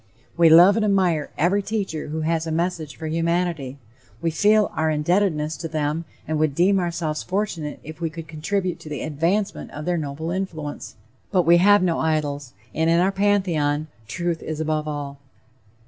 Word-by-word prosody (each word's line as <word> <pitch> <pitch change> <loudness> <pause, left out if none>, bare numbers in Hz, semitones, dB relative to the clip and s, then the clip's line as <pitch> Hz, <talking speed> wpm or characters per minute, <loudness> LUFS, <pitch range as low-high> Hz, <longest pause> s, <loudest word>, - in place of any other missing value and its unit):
We 170 -1 +6
love 175 +6 +8
and 225 - +1
admire 185 -7 +1
every 185 +6 +2
teacher 195 -7 -3
who 155 +2 -3
has 165 +1 0
a - - -2
message 160 -4 -2
for 160 - -8
humanity; 165 -4 -1 0.4
we 165 - -1
feel 210 +5 +3
our 160 0 0
indebtedness 155 0 +1
to 165 - -5
them 155 +1 -2 0.2
and 155 0 -1
would 155 -3 +1
deem 190 +4 +3
ourselves 170 -3 -2
fortunate 185 -6 -3
if 155 +2 -10
we 165 - 0
could 160 0 -9
contribute 175 +3 -2
to 155 - -10
the 145 - -4
advancement 165 +7 -1
of 150 +1 -7
their 180 -1 0
noble 155 +2 -4
influence; 170 -6 -5 0.3
but 185 -3 +2
we 170 +1 +6
have 205 +2 +5
no 170 -3 +1
idols, 145 -4 -1 0.2
and 160 +1 +1
in 170 +1 +4
our 185 +2 +3
pantheon, 170 -7 +1 0.2
truth 170 +5 -2
is 155 -1 -5
above 155 -1 -1
all. 145 -2 -5
165 Hz, 180 wpm, -23 LUFS, 155-180 Hz, 0.4 s, love